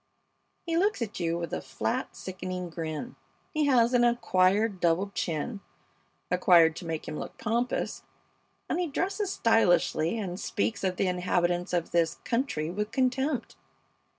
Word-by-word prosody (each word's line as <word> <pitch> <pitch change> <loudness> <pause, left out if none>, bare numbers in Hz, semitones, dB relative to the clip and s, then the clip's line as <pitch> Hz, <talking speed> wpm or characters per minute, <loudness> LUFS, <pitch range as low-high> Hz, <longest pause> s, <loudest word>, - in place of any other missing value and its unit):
He 330 -1 0
looks 395 - +2
at 215 -3 -6
you 170 -1 0
with 170 -2 -5
a - - -2
flat, 130 -5 -3
sickening 185 -1 -5
grin. 160 +8 -5 0.4
He 310 -2 +2
has 245 -3 +4
an 245 -1 +4
acquired 205 -3 +2
double 175 +4 +1
chin, 185 +6 -2 0.7
acquired 165 -5 +5
to - - -7
make 160 -1 -4
him 155 - -4
look - - -7
pompous, 235 +3 -1 0.7
and 330 - -1
he 355 - 0
dresses 390 +6 -1
stylishly 180 - +3
and 185 -4 -4
speaks 205 -1 -2
of 185 -1 0
the 195 - 0
inhabitants 180 0 0
of 175 -2 -1
this 165 -1 +2
country 230 - -1
with 210 +3 -2
contempt. 265 +2 0
190 Hz, 150 wpm, -28 LUFS, 170-240 Hz, 0.7 s, acquired